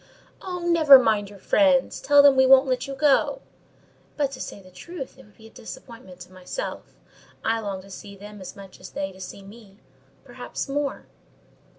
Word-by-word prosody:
"Oh, 365 -1 -5
never 330 -5 +7
mind 215 -5 +1
your 205 - -13
friends! 270 +6 +2
Tell 285 +1 +5
them 285 -1 +7
we 265 0 +4
won't 265 +1 +7
let 255 -1 -2
you 275 - -6
go." 295 - +2 0.8
"But, 285 -2 0
to 255 - -8
say - - -7
the 185 -1 -17
truth, 270 - -9
it - - -15
would 210 - -24
be 220 - -17
a 225 - -15
disappointment 220 -5 -12
to 180 +1 -13
myself: 185 - -7 0.5
I 225 0 +1
long 200 -3 -5
to 195 - -15
see 200 +1 -10
them 205 +1 -12
as 185 - -9
much 195 -2 -13
as - - -11
they 195 0 -5
to 190 0 -15
see 195 +1 -9
me—perhaps 205 +5 -11
more." 280 0 -3
230 Hz, 190 wpm, -24 LUFS, 195-275 Hz, 0.8 s, never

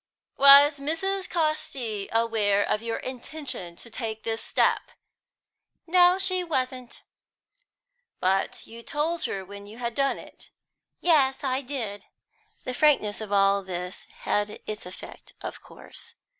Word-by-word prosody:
"Was 280 +1 +8
Mrs. 370 +7 -1
Casti 305 - -2
aware 220 -3 +2
of 210 - 0
your 230 0 -2
intention 255 - -6
to 235 - -12
take 220 -2 -5
this 225 0 -2
step?" - - +1 1.0
"No, 355 +1 +5
she 370 -1 0
wasn't." 255 -6 -3 1.2
"But 190 +1 0
you 230 +1 -11
told 310 +7 -1
her 195 -1 -3
when 200 +1 -10
you 215 +2 -11
had 235 -1 -3
done 275 +1 +1
it?" - - -13 0.5
"Yes, 275 -6 +3
I 260 0 0
did." 230 -7 -5 0.6
The 255 - -4
frankness 250 -8 +3
of 215 -2 -6
all 200 0 +4
this 180 -1 -6 0.2
had 210 0 -1
its 210 -4 -6
effect, 180 - -11
of - - -7
course. - - -10
245 Hz, 130 wpm, -26 LUFS, 205-295 Hz, 1.2 s, Was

